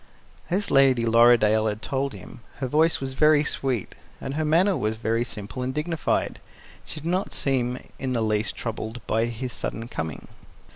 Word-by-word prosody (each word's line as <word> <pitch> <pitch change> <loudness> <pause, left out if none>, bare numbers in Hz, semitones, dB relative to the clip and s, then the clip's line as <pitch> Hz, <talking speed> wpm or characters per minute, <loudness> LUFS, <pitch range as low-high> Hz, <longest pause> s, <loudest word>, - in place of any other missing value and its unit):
As 195 +4 0
Lady 130 -4 +5
Lorridaile 115 -2 +5
had 105 0 -3
told 135 0 -1
him, 95 +2 -11 0.2
her 135 - -3
voice 155 +5 +3
was 135 -1 -4
very 150 +1 +5
sweet, 130 -7 -2 0.3
and 135 - -5
her 155 +2 -1
manner 175 +6 +3
was 110 -6 -1
very 115 +1 0
simple 115 +1 -6
and 125 +1 -1
dignified. 155 +1 -1 0.4
She 155 - -6
did 160 - -6
not 185 +3 -1
seem 125 -2 0 0.2
in 130 -1 -2
the 115 -2 +1
least 110 0 0
troubled 115 +1 -5
by 115 +1 +1
his 120 +1 -4
sudden 115 +1 -4
coming. 80 - -5
125 Hz, 175 wpm, -25 LUFS, 115-145 Hz, 0.4 s, Lady